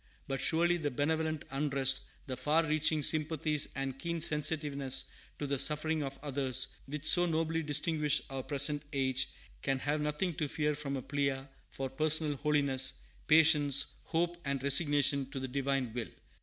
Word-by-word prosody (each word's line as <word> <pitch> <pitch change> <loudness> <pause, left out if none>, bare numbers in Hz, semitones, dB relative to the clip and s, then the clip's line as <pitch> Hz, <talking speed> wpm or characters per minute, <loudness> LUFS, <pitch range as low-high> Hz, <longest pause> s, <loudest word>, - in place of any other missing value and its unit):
But 135 -1 -3
surely 170 +2 +2
the 150 -3 -2
benevolent 155 +3 -2
unrest, 135 -1 +1 0.2
the 130 - -5
far 150 +6 +1
reaching 155 0 +1
sympathies 155 0 +1
and 135 -1 -4
keen 170 +3 -3
sensitiveness 145 -4 +1 0.3
to 145 - -4
the 140 -1 -1
suffering 155 +2 +2
of 135 0 -6
others, 135 -3 +2 0.2
which 150 +1 -7
so 175 +2 +4
nobly 165 0 -1
distinguish 150 0 +1
our 135 -1 -4
present 145 +2 +1
age, 135 -1 0 0.3
can 135 -1 -1
have 145 +3 -2
nothing 150 +4 -2
to 150 - -2
fear 150 +1 -1
from 140 -2 -4
a 130 - -7
plea 140 -2 -2 0.3
for 135 - -5
personal 155 +2 +2
holiness, 140 -3 +2 0.3
patience, 150 -3 +4
hope, 170 +1 -1
and 140 -1 -3
resignation 140 -1 +3
to 135 -1 -6
the 130 - -4
Divine 135 -2 -2
will. 120 -2 -5
145 Hz, 155 wpm, -31 LUFS, 135-155 Hz, 0.3 s, so